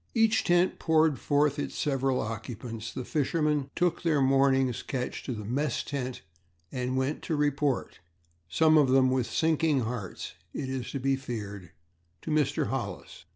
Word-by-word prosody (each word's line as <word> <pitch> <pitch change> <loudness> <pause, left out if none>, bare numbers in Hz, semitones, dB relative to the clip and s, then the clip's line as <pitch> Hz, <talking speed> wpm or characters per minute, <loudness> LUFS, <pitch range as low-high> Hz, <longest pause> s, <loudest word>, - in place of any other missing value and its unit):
As 225 - -2
each 225 0 +3
tent 175 +1 +3
poured 160 -4 +3
forth 145 0 +2
its - - -4
several 135 -3 +1
occupants, 115 0 -5
the 130 - -5
fishermen 150 -2 0
took 175 -1 +1
their 160 -4 +2
mornings 135 -2 +3
catch 125 -2 -4
to - - -3
the 105 -2 -6
mess 130 +3 -1
tent 130 -3 -4 0.5
and 125 0 -2
went 130 +3 -1
to 160 - -2
report 145 -2 0 0.5
some 155 - +5
of 140 -3 +4
them 130 0 +4
with 130 -2 +1
sinking 160 -3 +2
hearts, 110 -5 -5 0.2
it 135 - -3
is 130 -2 -3
to 140 - -2
be 135 +1 +1
feared 105 -8 -6 0.5
to - - -4
Mr. 150 -2 +1
Hollis. - - -5
135 Hz, 160 wpm, -28 LUFS, 125-150 Hz, 0.5 s, some